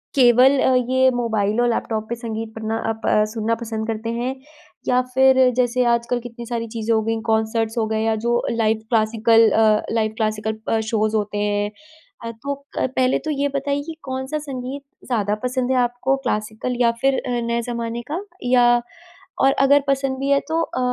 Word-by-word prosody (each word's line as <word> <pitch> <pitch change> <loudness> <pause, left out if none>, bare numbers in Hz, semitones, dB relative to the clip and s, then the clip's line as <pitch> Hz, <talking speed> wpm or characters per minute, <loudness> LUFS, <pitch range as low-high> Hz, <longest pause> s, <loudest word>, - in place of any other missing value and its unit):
केवल 255 +1 +6
अ, 260 - +3 0.2
ये 260 0 +4
मोबाइल 220 -2 0
और 240 - +2
लैपटॉप 220 -1 -2
पे 235 - -2
संगीत 225 -2 -6
पढ़ना 220 0 -3
अप 225 0 -4
अ, 210 - +4
सुनना 225 0 0
पसंद 225 -1 -5
करते 225 0 -3
हैं 250 +3 -2 0.5
या 250 0 +3
फिर 265 0 +5 0.2
जैसे 250 0 +2
आजकल 235 +1 +1
कितनी 240 0 -9
सारी 230 -1 -3
चीज़ें 225 0 -2
हो 220 - +2
गई, 225 +1 -1
कंसर्ट्स 220 +1 0
हो 225 - +2
गए 220 0 -1
या 225 0 +1
जो 240 0 +2
लाइव 225 -1 +1
क्लासिकल 225 0 +4
अ, 215 -1 +4
लाइव 220 -1 0
क्लासिकल 215 0 -2
अ, 225 - +2
शोज़ 215 -1 0
होते 210 -1 -1
हैं। 205 0 0 0.5
अ, 230 - -3
तो 280 +5 -5 0.2
पहले 255 0 +1
तो 310 - -1
ये 285 -1 0
बताइए 280 +1 -1
कि 325 - -6
कौन-सा 265 +3 -3
संगीत 275 -1 -6 0.3
ज़्यादा 210 -4 0
पसंद 255 0 -1
है 260 - +2
आपको 245 +2 0
क्लासिकल 215 +4 -2
या 235 -1 +4
फिर 270 0 +2
अ, - - -3 0.2
नए 235 0 0
ज़माने 235 0 -3
का 360 +5 -2 0.2
या 245 -1 +4 0.6
और 270 - +5
अगर 280 +1 +5
पसंद 270 -1 0
भी 275 +1 -2
है 280 - +5
तो 325 +1 +1
अ, 255 - -3
235 Hz, 190 wpm, -21 LUFS, 220-260 Hz, 0.6 s, केवल